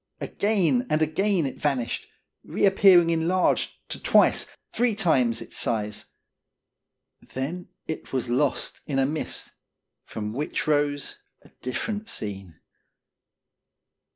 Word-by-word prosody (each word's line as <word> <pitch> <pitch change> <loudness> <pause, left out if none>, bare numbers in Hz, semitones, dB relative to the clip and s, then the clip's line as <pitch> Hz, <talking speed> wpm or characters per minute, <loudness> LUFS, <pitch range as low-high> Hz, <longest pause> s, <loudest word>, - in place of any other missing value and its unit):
Again 215 +4 +1
and 155 +1 +2
again 175 +2 +1
it 135 - -5
vanished, 135 -5 -1 0.4
re - - 0
appearing 190 -3 +6
enlarged 170 +3 +1 0.2
to - - -4
twice, - - +4 0.3
three 240 -3 +2
times, 135 - +2
its - - -12
size. 105 -2 -1 1.1
Then 155 +8 -5 0.2
it 160 - -6
was 130 -2 -1
lost 130 +3 0
in 140 -3 -1
a 135 - +3
mist, 150 +3 -3 0.5
from 105 -1 -5
which 145 +5 -2
rose 145 -1 0 0.3
a - - -18
different 210 - -3
scene. 95 - -6
150 Hz, 115 wpm, -25 LUFS, 125-185 Hz, 1.1 s, appearing